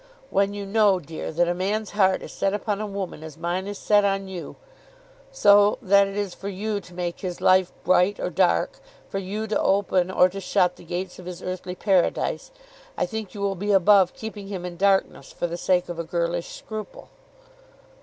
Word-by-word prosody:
When 200 Hz, +1 st, +1 dB
you 200 Hz, -1 st, -5 dB
know, 200 Hz, -2 st, +3 dB
dear, 160 Hz, -1 st, -6 dB
that 170 Hz, +2 st, +2 dB
a 175 Hz, -, +1 dB
man's 205 Hz, +4 st, -2 dB
heart 190 Hz, -2 st, +2 dB
is -, -, -8 dB
set 195 Hz, +1 st, 0 dB
upon 210 Hz, -1 st, -2 dB
a 215 Hz, -, -3 dB
woman 195 Hz, -5 st, -5 dB
as 160 Hz, -2 st, -9 dB
mine 180 Hz, +3 st, -2 dB
is 205 Hz, 0 st, -5 dB
set 205 Hz, -1 st, +3 dB
on 195 Hz, -1 st, 0 dB
you, 185 Hz, -3 st, -7 dB, 0.8 s
so 205 Hz, -, +5 dB
that 200 Hz, +1 st, +4 dB
it 195 Hz, +1 st, -6 dB
is 200 Hz, -3 st, -2 dB
for 200 Hz, -, -6 dB
you 205 Hz, +2 st, -2 dB
to 180 Hz, -2 st, -15 dB
make 175 Hz, -1 st, -3 dB
his 180 Hz, -2 st, -5 dB
life 185 Hz, -1 st, +4 dB
bright 185 Hz, +3 st, +3 dB
or 180 Hz, -, -2 dB
dark, 85 Hz, -, +1 dB, 0.3 s
for 195 Hz, -, -3 dB
you 200 Hz, +3 st, -4 dB
to 220 Hz, -, 0 dB
open 190 Hz, -2 st, +2 dB
or 185 Hz, -1 st, +5 dB
to 195 Hz, +2 st, -7 dB
shut 180 Hz, -2 st, +1 dB
the -, -, -14 dB
gates 180 Hz, +2 st, -5 dB
of 180 Hz, -, -10 dB
his 180 Hz, -1 st, -7 dB
earthly 185 Hz, 0 st, -5 dB
Paradise, 190 Hz, -2 st, +1 dB, 0.5 s
I -, -, +1 dB
think 220 Hz, -3 st, -6 dB
you 200 Hz, -, -6 dB
will 200 Hz, -1 st, +1 dB
be 205 Hz, +3 st, -2 dB
above 195 Hz, -1 st, +5 dB
keeping 210 Hz, -3 st, -7 dB
him 190 Hz, -3 st, -5 dB
in 175 Hz, -1 st, -6 dB
darkness 195 Hz, +1 st, +1 dB
for -, -, -3 dB
the 170 Hz, 0 st, -3 dB
sake 180 Hz, 0 st, +1 dB
of 175 Hz, -1 st, -6 dB
a -, -, -1 dB
girlish 170 Hz, +1 st, -2 dB
scruple." 215 Hz, -2 st, -8 dB
190 Hz, 205 wpm, -24 LUFS, 180-205 Hz, 0.8 s, so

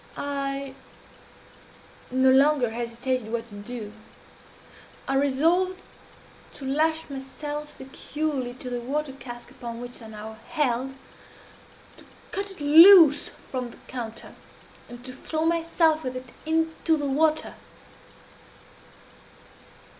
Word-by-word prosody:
"I 275 Hz, -1 st, -3 dB, 1.4 s
no 260 Hz, +1 st, +4 dB
longer 270 Hz, -3 st, +4 dB
hesitated 235 Hz, 0 st, -3 dB
what 235 Hz, 0 st, -3 dB
to 205 Hz, -, -11 dB
do. 210 Hz, 0 st, -7 dB, 1.1 s
I -, -, 0 dB
resolved 330 Hz, +8 st, +2 dB, 0.7 s
to 275 Hz, -, -8 dB
lash 315 Hz, +4 st, +1 dB
myself 290 Hz, +2 st, -6 dB
securely 270 Hz, -1 st, -4 dB
to 250 Hz, 0 st, -7 dB
the 245 Hz, -, -2 dB
water 275 Hz, +3 st, -3 dB
cask 240 Hz, -3 st, -10 dB
upon 240 Hz, -3 st, -7 dB
which 245 Hz, 0 st, -8 dB
I 225 Hz, -, -10 dB
now 220 Hz, 0 st, -9 dB
held, 270 Hz, -4 st, 0 dB, 1.0 s
to -, -, -16 dB, 0.3 s
cut 400 Hz, 0 st, -3 dB
it 385 Hz, -5 st, -11 dB
loose 320 Hz, 0 st, +8 dB, 0.2 s
from 255 Hz, -2 st, -3 dB
the -, -, -14 dB
counter, 230 Hz, -3 st, -7 dB, 0.6 s
and 245 Hz, +1 st, -11 dB
to 255 Hz, -, -6 dB
throw 315 Hz, +4 st, -3 dB
myself 330 Hz, -1 st, +2 dB
with 255 Hz, 0 st, -4 dB
it 255 Hz, -1 st, -7 dB, 0.2 s
into 320 Hz, 0 st, +1 dB
the 290 Hz, -, -2 dB
water. 310 Hz, +3 st, +1 dB
270 Hz, 115 wpm, -26 LUFS, 245-310 Hz, 1.4 s, loose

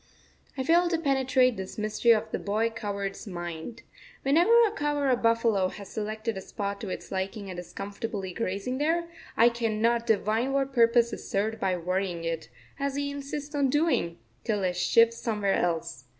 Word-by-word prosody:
I 260 Hz, -, -1 dB
fail 345 Hz, +5 st, +4 dB
to 335 Hz, -, +1 dB
penetrate 265 Hz, -5 st, +2 dB
this 190 Hz, -1 st, -6 dB
mystery 215 Hz, +2 st, 0 dB
of 225 Hz, -2 st, +4 dB
the -, -, -2 dB
boy 220 Hz, +3 st, 0 dB
cowherd's 200 Hz, -3 st, -4 dB
mind. 175 Hz, +4 st, -6 dB, 0.4 s
Whenever 325 Hz, +10 st, +4 dB
a 425 Hz, -, 0 dB
cow 295 Hz, -7 st, -1 dB
or 280 Hz, -2 st, +2 dB
a -, -, +5 dB
buffalo 230 Hz, -4 st, +2 dB
has 200 Hz, +1 st, -9 dB
selected 215 Hz, +1 st, -3 dB
a 190 Hz, -, -5 dB
spot 200 Hz, +1 st, -4 dB
to 210 Hz, -, -5 dB
its -, -, -6 dB
liking 195 Hz, +1 st, -3 dB
and 175 Hz, -, -6 dB
is 180 Hz, -, -9 dB
comfortably 200 Hz, -1 st, -5 dB
grazing 230 Hz, +5 st, -2 dB
there, 335 Hz, +3 st, +1 dB, 0.3 s
I 235 Hz, +1 st, +7 dB
cannot 230 Hz, 0 st, 0 dB
divine 225 Hz, +4 st, +1 dB
what 275 Hz, 0 st, 0 dB
purpose 235 Hz, -1 st, +4 dB
is -, -, -7 dB
served 215 Hz, +3 st, -1 dB
by 185 Hz, -3 st, 0 dB
worrying 180 Hz, 0 st, -2 dB
it, 165 Hz, -1 st, -3 dB, 0.3 s
as 280 Hz, 0 st, -1 dB
he 285 Hz, 0 st, -2 dB
insists 285 Hz, +1 st, -6 dB
on 280 Hz, -2 st, +2 dB
doing, 290 Hz, -, +1 dB, 0.3 s
till 210 Hz, -3 st, -1 dB
it 180 Hz, -1 st, 0 dB
shifts 230 Hz, +6 st, +4 dB
somewhere 210 Hz, -4 st, 0 dB
else. 165 Hz, -5 st, -1 dB
225 Hz, 180 wpm, -28 LUFS, 195-265 Hz, 0.4 s, I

